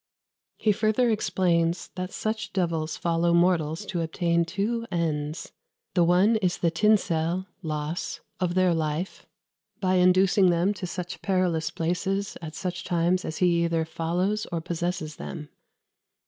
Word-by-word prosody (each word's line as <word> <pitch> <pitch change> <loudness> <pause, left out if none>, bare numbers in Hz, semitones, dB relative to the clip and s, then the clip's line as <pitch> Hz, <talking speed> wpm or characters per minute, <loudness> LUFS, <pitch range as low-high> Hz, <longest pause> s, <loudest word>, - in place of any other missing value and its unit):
" - - -66
He 220 - +2
further 220 +4 +2
explains 175 -5 +1
that 185 0 -5
such 220 0 -3
devils 165 -4 -1
follow 170 0 +1
mortals 170 0 +2
to 180 -3 -2
obtain 170 +1 +1
two 210 +7 -2
ends: 155 -2 -2 0.4
"the 175 - +4
one 185 +6 +4
is 185 -4 0
the 170 - +1
tinsell 180 -2 +2 0.2
(loss) 155 0 -3 0.2
of 180 -2 0
their 185 -2 +4
life 160 +3 -3 0.5
by 185 -1 +2
inducing 185 +1 +5
them 175 +4 +2
to 190 -2 -5
such 180 +1 -6
perrilous 180 -5 +1
places 190 +4 -2
at 155 -2 -7
such 180 0 -4
times 175 +1 +1
as 160 - -4
he 175 -2 +3
either 165 -1 +1
follows 175 +6 -1
or 170 - -1
possesses 170 -1 -3
them. 150 -4 -7
175 Hz, 145 wpm, -26 LUFS, 165-190 Hz, 0.5 s, inducing